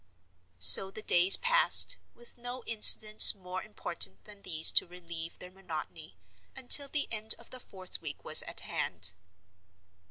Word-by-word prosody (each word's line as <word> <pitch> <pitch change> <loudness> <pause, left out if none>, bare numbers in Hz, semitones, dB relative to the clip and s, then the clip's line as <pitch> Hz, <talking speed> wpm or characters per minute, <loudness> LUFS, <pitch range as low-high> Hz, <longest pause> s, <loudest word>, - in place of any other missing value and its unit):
So 95 - +4
the 215 +2 -12
days 180 0 +2
passed, - - +3 0.2
with 240 0 -11
no 245 +1 -12
incidents 215 -1 +4
more 185 -1 -13
important 170 - -6
than 205 -1 -16
these 160 -4 +2
to - - -1
relieve 170 -2 -14
their 180 - -18
monotony, 165 -4 -13 0.4
until 280 +3 0
the 290 +1 -8
end 220 -1 -5
of 235 - -22
the 255 - -11
fourth 185 -6 -13
week - - -14
was - - +1
at - - -13
hand. 90 +1 -6
195 Hz, 150 wpm, -24 LUFS, 170-230 Hz, 0.4 s, So